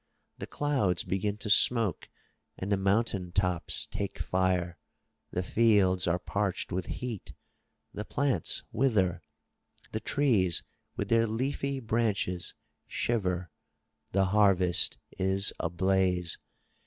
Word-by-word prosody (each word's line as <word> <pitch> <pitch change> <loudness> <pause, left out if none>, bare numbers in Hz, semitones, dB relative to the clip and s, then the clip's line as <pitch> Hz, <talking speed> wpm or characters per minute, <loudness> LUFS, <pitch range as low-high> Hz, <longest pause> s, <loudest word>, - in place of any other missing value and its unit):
The - - -6
clouds 130 -12 0
begin 95 +3 -2
to 105 - -6
smoke 115 -4 +3 0.5
and 95 +2 -4
the - - +4
mountain 95 -2 0
tops 90 -2 -1
take - - -5
fire, 90 -2 0 0.5
the 90 - -2
fields 95 -4 +3
are 85 +1 +2
parched 100 +1 -2
with 90 0 -2
heat, 120 -6 -6 0.6
the 105 - -4
plants 130 - 0
wither, 105 -8 +1 0.7
the 110 - -2
trees 110 - +2 0.3
with 100 - -3
their 115 0 +3
leafy 135 +4 -2
branches 110 -6 -1 0.3
shiver, 90 -7 -1 0.6
the 95 0 +2
harvest 95 -3 +4 0.2
is 95 +1 +3
ablaze. 90 0 +1
95 Hz, 110 wpm, -29 LUFS, 90-115 Hz, 0.7 s, the